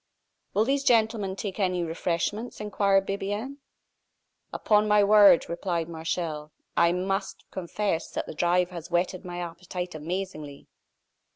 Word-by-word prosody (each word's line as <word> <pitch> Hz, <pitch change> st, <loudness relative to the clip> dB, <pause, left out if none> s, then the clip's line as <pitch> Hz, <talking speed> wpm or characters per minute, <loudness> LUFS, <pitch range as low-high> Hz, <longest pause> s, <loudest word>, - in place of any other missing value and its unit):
"Will 215 Hz, -, +3 dB
these 275 Hz, +2 st, +1 dB
gentlemen 220 Hz, -5 st, +2 dB
take 200 Hz, 0 st, -5 dB
any 180 Hz, -3 st, +1 dB
refreshments?" 170 Hz, +7 st, -2 dB
inquired 200 Hz, -2 st, +2 dB
Bibiaine. 205 Hz, +7 st, -3 dB, 0.9 s
"Upon 210 Hz, 0 st, +2 dB
my 210 Hz, 0 st, +5 dB
word," 200 Hz, -4 st, +7 dB
replied 170 Hz, -1 st, -2 dB
Martial, 160 Hz, -2 st, -4 dB, 0.2 s
"I 170 Hz, 0 st, +4 dB
must 195 Hz, +2 st, -2 dB
confess 190 Hz, -1 st, -2 dB
that -, -, -3 dB
the -, -, -7 dB
drive 175 Hz, +2 st, +1 dB
has 170 Hz, -2 st, -8 dB
whetted 180 Hz, +1 st, 0 dB
my 175 Hz, -1 st, -6 dB
appetite 175 Hz, +1 st, -6 dB
amazingly." 155 Hz, -3 st, -5 dB
185 Hz, 125 wpm, -27 LUFS, 170-205 Hz, 0.9 s, word